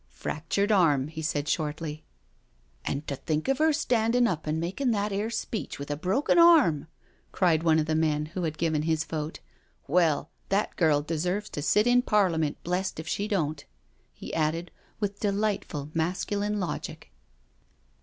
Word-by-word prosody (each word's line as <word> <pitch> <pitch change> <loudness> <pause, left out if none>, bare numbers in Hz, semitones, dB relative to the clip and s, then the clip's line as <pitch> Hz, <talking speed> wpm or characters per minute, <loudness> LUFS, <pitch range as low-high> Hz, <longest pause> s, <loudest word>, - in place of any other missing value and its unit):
" - - -37
Fractured 185 +7 -2
arm," 150 -8 +3
he 160 0 -6
said 150 -2 -1
shortly. 155 0 -2 0.4
" - - -38
And 140 +2 -2
to 140 - -3
think 155 +2 -2
of 270 +1 +1
her 315 +1 +4
standin' 245 -5 +2
up 160 -8 -1
and 155 +1 0
makin' 190 +11 -1
that 210 -2 0
'ere 205 +3 -1
speech 225 -1 -4
with 140 +1 -6
a - - 0
broken 190 - +2
arm 320 - +6
1 140 - -13 0.2
" - - -38
cried 170 -4 +3
one 160 -1 +4
of 155 - +2
the 160 - -1
men 155 -1 +1
who 185 - -3
had 160 -2 -2
given 160 -2 +1
his 160 0 0
vote. 155 - -5 0.3
" - - -39
Well, 160 -5 +2 0.2
that 200 +2 0
girl 150 -4 +3
deserves 180 +6 -2
to 145 - -4
sit 185 +9 +3
in 245 0 +5
Parliament, 180 - +1
blest 180 0 -2
if 160 - -7
she 205 +5 -1
don't," 155 -8 -1 0.5
he - - -9
added, 165 +2 -1 0.3
with 205 -1 -2
delightful 200 -8 -1
masculine 200 +5 -1
logic. 165 - -5
165 Hz, 180 wpm, -27 LUFS, 155-205 Hz, 0.5 s, arm